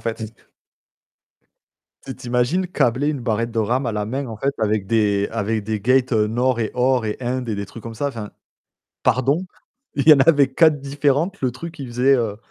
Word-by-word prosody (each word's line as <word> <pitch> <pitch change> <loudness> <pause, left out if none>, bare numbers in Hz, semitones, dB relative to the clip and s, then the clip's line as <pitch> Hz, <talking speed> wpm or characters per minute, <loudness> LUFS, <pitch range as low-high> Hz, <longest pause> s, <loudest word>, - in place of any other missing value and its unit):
fait. 110 -1 -5 1.7
Tu 135 - -6
t'imagines 125 +11 0
câbler 135 -4 +1
une 150 -3 -2
barrette 115 -1 -1
de 115 - -3
RAM 120 +5 0
à - - 0
la 105 -1 -2
main 130 +4 -3
en 110 - -7
fait 140 +6 -1
avec 105 -2 0
des 100 -2 +1
avec 110 -1 -2
des 110 0 -2
gates, 130 +4 +2
heu, 105 -2 +3
nord 120 +2 0
et 110 - -1
or 125 -1 +2
et 105 - -2
indes 125 0 -3
et 110 - -1
des 100 0 -4
trucs 115 +3 -11
comme 115 0 -8
ça. 145 - -2
Enfin, 115 -6 -7 0.7
pardon, 140 +9 +1 0.5
il 140 +2 0
y - - +12
en 140 - +5
avait 140 -1 +5
4 155 0 +4
différentes, 145 +6 0
le 130 - +1
truc 160 +6 -9
il 135 - -6
faisait, 125 +3 +3
heu, 110 -4 -2
125 Hz, 200 wpm, -21 LUFS, 110-140 Hz, 1.7 s, y